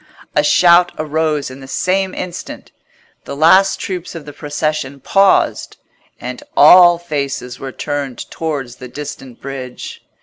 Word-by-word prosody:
A 150 - +3
shout 175 +3 +5
arose 155 -2 -1
in 130 - -11
the 135 - -11
same 190 +5 -1
instant; 180 -2 -7 0.5
the - - -6
last 190 +6 +4
troops 180 -2 -5
of 160 -3 -8
the 145 - -10
procession 150 -2 -3
paused, 195 +7 +2 0.4
and 125 0 -7 0.2
all 175 +3 +8
faces 140 -6 -4
were 135 - -6
turned 140 -2 -4
towards 140 -7 -4
the 125 - -9
distant 135 -2 -9
bridge. 130 -2 -8
150 Hz, 135 wpm, -17 LUFS, 135-175 Hz, 0.5 s, all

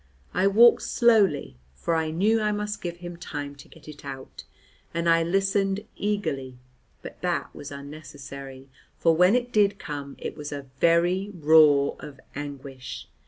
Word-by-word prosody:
I 185 +2 +3
walked 230 +4 +6
slowly, 205 - +2 0.2
for 165 - -2
I 160 -1 0
knew 210 +8 +2
I 210 0 +1
must 210 0 -3
give 175 -1 -5
him 175 -1 -8
time 145 -4 -6
to - - -14
get - - -17
it 150 -1 -11
out, 135 -1 -9 0.5
and 170 0 0
I 165 0 +5
listened 195 +3 +1
eagerly, 140 -12 -2 0.5
but - - -10
that 175 -6 -2
was 145 - -8
unnecessary, 140 -2 -9 0.3
for 165 -1 +3
when 180 +6 +5
it 245 0 0
did 205 -1 +3
come 145 -6 -6
it - - -6
was 150 -1 -7
a 140 -1 -5
very 175 +5 +3
roar 150 -3 +5
of 140 -3 -10
anguish. 140 -2 -7
165 Hz, 160 wpm, -26 LUFS, 140-195 Hz, 0.5 s, walked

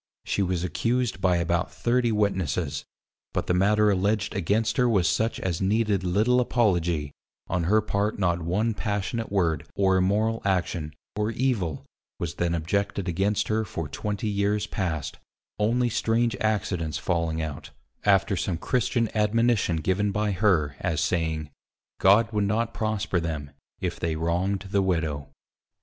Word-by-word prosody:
She - - 0
was 90 -2 0
accused 115 +4 -1
by 90 -2 +3
about 85 +1 0
30 120 0 +1
Witnesses; 90 -8 -1 0.5
but - - -1
the - - +1
matter 105 +3 +4
alledged 100 +2 0
against 105 +3 0
her 125 -2 +4
was 95 -6 +3
such 110 +1 0
as 90 -2 -2
needed 105 -1 +1
little 110 +8 +3
apology, 85 -11 +1 0.4
on 90 -3 -1
her 110 +5 +4
part 105 0 -1
not 90 -3 +1
one 100 +8 0
passionate 105 +3 -2
word, 85 -6 0
or 95 -1 +3
immoral 105 +5 +1
action, 85 -5 -1 0.2
or 105 +1 0
evil, 110 - -1 0.3
was 85 -1 -3
then 85 0 0
objected 100 +3 -1
against 95 +4 0
her 110 +1 +1
for 85 -6 -5
20 105 +7 -3
years 100 0 0
past, 80 -7 -3 0.4
only 120 +4 +2
strange 115 0 +1
accidents 95 -7 -1
falling 85 -2 -1
out, 80 -3 -5 0.3
after 100 +1 +3
some 90 -1 -1
Christian 120 +4 0
admonition 110 -3 +2
given 95 +5 0
by 105 +1 0
her, 90 -7 +2
as 85 -4 -1
saying, 80 -3 -1 0.5
_God 110 +4 +5
would 105 -1 +1
not 110 +3 0
prosper 105 -4 -1
them, 80 -4 -4 0.3
if - - -3
they 80 -1 -1
wrong'd 90 +5 -1
the 100 - +3
Widow. 80 -6 -1
100 Hz, 150 wpm, -26 LUFS, 85-110 Hz, 0.5 s, God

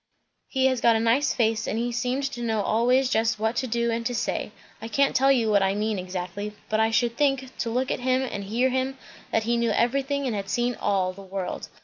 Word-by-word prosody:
"He 265 -1 0
has 260 -3 +2
got 235 -1 +5
a - - +2
nice 230 +6 +2
face, 225 -2 0
and 215 - -1
he 240 +1 -1
seemed 250 +3 -1
to 270 -3 -4
know 220 -3 0
always 250 +5 +3
just 225 -2 +1
what 220 +2 -1
to 260 - 0
do 235 0 0
and 230 0 -2
to 245 - -3
say; - - -2 0.3
I 225 - -5
can't 275 +5 +1
tell 270 +1 +5
you 230 -5 +2
what 200 -1 +4
I 195 0 +1
mean 210 -1 -1
exactly; 185 +3 -5 0.2
but 215 - +1
I 220 0 +3
should 235 +1 +1
think, 270 -2 0
to 230 - -1
look 255 +3 -1
at - - -1
him 255 +1 +1
and 205 -6 -4
hear 240 +6 +1
him, 260 +1 -1 0.3
that 225 - +1
he 235 +2 +1
knew 235 0 +1
everything 275 +5 0
and 240 -4 -1
had 195 -1 -4
seen 240 +2 0
all 195 -4 0
the 200 - -12
world. 190 -1 -5
235 Hz, 245 wpm, -25 LUFS, 215-255 Hz, 0.3 s, got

